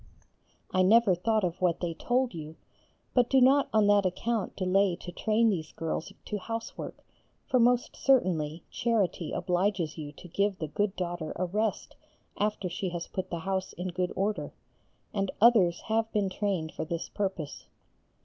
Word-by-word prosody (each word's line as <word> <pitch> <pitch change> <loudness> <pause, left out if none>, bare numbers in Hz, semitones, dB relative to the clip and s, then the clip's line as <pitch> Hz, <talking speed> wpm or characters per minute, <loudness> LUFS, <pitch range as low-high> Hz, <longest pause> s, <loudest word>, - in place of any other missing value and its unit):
I 185 - +3
never 210 +1 +5
thought 215 +4 +1
of 180 0 -2
what 175 -2 +2
they 170 -2 -2
told 245 +7 0
you, 155 -1 -7 0.6
but 245 -2 +3
do 270 - +5
not 270 +3 +5
on 215 -1 +4
that 205 0 +5
account 210 +4 -1
delay 190 0 +2
to 175 0 -9
train 220 +5 +2
these 160 -5 -3
girls 165 0 -3
to 210 - -3
housework, 225 +3 -6 0.4
for 255 - +2
most 245 +1 +3
certainly 170 - +2
charity 205 -8 0
obliges 180 -3 0
you 145 -1 -6
to 175 - -12
give 200 +3 0
the 160 - -3
good 205 +5 0
daughter 175 -3 -3
a 185 - -1
rest 210 +3 -2 0.4
after 210 -2 -1
she 180 +2 -3
has 175 -1 -4
put 190 - -5
the 170 - -3
house 190 +1 -2
in 180 +1 -4
good 180 0 -1
order, 205 +2 -2 0.6
and 195 -2 0
others 200 -7 +5
have 225 0 0
been 200 -3 0
trained 185 -5 -1
for - - -4
this 165 +1 -4
purpose. 190 -7 -4
190 Hz, 170 wpm, -29 LUFS, 175-215 Hz, 0.6 s, never